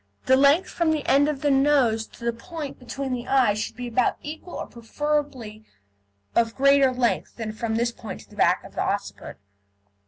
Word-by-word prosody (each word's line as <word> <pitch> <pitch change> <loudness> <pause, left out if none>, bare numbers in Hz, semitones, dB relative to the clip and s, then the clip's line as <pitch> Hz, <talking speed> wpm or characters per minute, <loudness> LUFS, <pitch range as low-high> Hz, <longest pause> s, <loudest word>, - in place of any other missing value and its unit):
The 260 - +5
length 285 +7 +4
from 335 -2 0
the 310 -2 0
end 285 +2 +4
of 285 -3 -3
the 290 - +2
nose 270 -5 +3
to 235 - -12
the 235 - +1
point 295 +4 -7
between 265 +1 -4
the 245 0 -4
eyes 250 -6 +3
should 215 - -4
be 245 +1 -5
about 240 +1 +1
equal, 315 +4 -8
or - - -4
preferably 245 -2 -3 0.7
of 230 -1 +2
greater 275 0 +5
length 250 -2 -1
than 225 -2 -4
from 220 +1 -3
this 235 +1 +1
point - - -8
to - - -19
the - - -14
back - - +2
of - - -13
the - - -2
occiput. - - -4
260 Hz, 195 wpm, -24 LUFS, 235-290 Hz, 0.7 s, The